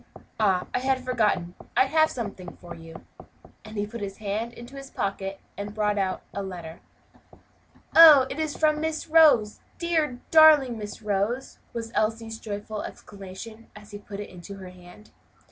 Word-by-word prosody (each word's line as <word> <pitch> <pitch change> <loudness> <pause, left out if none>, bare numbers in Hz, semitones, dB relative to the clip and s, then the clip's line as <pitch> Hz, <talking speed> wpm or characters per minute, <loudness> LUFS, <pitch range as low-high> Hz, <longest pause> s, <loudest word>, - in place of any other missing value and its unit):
Ah! 190 -4 +2
I - - +1
had 260 0 0
forgotten! 210 -8 0 0.2
I - - +6
have 315 +3 +3
something 200 -7 -7
for 175 -1 -10
you;" 165 -1 -12 0.6
and 215 0 -10
he 205 - 0
put 230 +2 -8
his 195 -1 -5
hand 215 +2 -3
into 240 +3 -11
his 275 0 -9
pocket 195 -2 -4 0.2
and 205 +1 -6
brought 210 -1 0
out 190 -1 -2
a 200 - -3
letter. 175 -4 -8 1.2
"Oh! 310 -5 +10
it 265 - -6
is 310 -2 -2
from 305 -1 +2
Miss 320 0 -3
Rose! 305 -10 +5 0.2
dear, 320 -7 0
darling 300 -7 +6
Miss 210 +1 -8
Rose!" 210 +5 -2
was 230 -1 -6
Elsie's 225 +1 -1
joyful 210 0 -5
exclamation, 205 +3 -10
as 210 0 -13
he 205 - -8
put 205 0 -9
it 205 - -7
in 180 +2 -10
her 190 -1 -9
hand. 180 +3 -16
215 Hz, 165 wpm, -26 LUFS, 200-260 Hz, 1.2 s, Oh